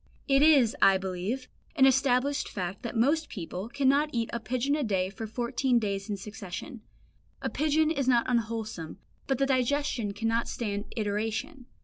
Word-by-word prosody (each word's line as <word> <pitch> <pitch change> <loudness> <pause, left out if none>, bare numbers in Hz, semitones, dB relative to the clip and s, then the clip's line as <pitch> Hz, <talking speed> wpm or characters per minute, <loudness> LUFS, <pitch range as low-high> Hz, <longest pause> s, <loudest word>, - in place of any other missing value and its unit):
It 275 0 +4
is, 285 -6 +5
I 195 -1 +6
believe, 190 +7 -3 0.3
an 265 - +6
established 265 +1 +2
fact 185 0 -4
that 235 -2 -5
most 295 +7 +2
people 185 +2 -6
cannot 280 +3 +2
eat 230 -3 -2
a 235 - -1
pigeon 255 +5 0
a 300 - -1
day 190 -4 0
for 220 +3 -6
fourteen 240 +3 0
days 200 -2 -2
in 205 - -2
succession; 210 +4 -8 0.6
a - - -3
pigeon 310 +1 +2
is 275 -5 -1
not 240 -2 +4
unwholesome, 220 -8 -2 0.3
but 270 - +1
the 275 - +2
digestion 265 -4 0
cannot 225 +2 0
stand 205 -3 -3
iteration. 220 +6 -2
235 Hz, 160 wpm, -28 LUFS, 210-270 Hz, 0.6 s, I